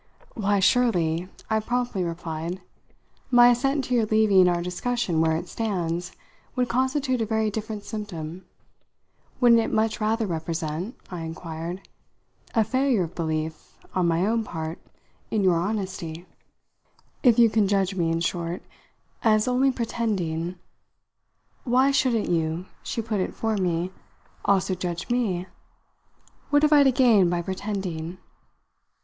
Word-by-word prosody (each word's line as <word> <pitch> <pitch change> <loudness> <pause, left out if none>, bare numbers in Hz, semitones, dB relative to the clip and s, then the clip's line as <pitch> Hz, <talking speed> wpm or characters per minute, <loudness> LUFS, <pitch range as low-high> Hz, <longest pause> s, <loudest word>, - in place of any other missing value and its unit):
"Why, 205 -2 +1
surely," 185 -6 +2 0.2
I 220 -1 +1
promptly 240 -3 -1
replied, 170 +1 -4 0.7
"my 245 -1 +7
assent 270 +3 +2
to 250 - -3
your 230 -3 +2
leaving 210 -4 +5
our 175 -1 0
discussion 180 -1 -1
where 160 0 +2
it 170 - -6
stands 175 -6 -2 0.4
would 250 -1 +1
constitute 260 0 +1
a - - +1
very 220 -1 +1
different 215 0 -5
symptom. 185 -6 -6 0.9
Wouldn't 235 -2 +6
it - - -2
much 220 +1 0
rather 220 +1 +1
represent," 165 +2 -3 0.2
I 180 - -5
inquired, 165 +2 -6 0.7
"a 225 - +5
failure 260 -3 +1
of 170 +1 -6
belief 160 -1 -4 0.2
on 180 -2 +2
my 170 +2 +2
own 225 +2 +1
part 160 -4 -5 0.5
in 210 -2 0
your 180 -3 +4
honesty? 185 -4 -3 1.0
If 245 -4 +5
you 230 -2 +6
can 215 -3 +3
judge 195 -1 +1
me, 170 -3 0
in 165 0 0
short, 170 0 -2 0.6
as 215 -1 +3
only 255 +2 +3
pretending 190 -9 -2 0.6
" - - -44
"Why 265 +2 +5
shouldn't 250 -5 +2
you," 165 +1 0 0.2
she 230 - -3
put 215 -2 -2
in 185 - -2
for 225 -1 -1
me, 180 -2 0 0.5
"also 195 -1 +2
judge 180 +2 -4
me? 200 -8 0 1.0
What 290 +1 +3
have 300 0 +5
I 290 - +7
to 270 -1 +5
gain 235 -8 +5
by 175 0 -1
pretending?" 185 -3 -4
195 Hz, 140 wpm, -25 LUFS, 170-230 Hz, 1.0 s, my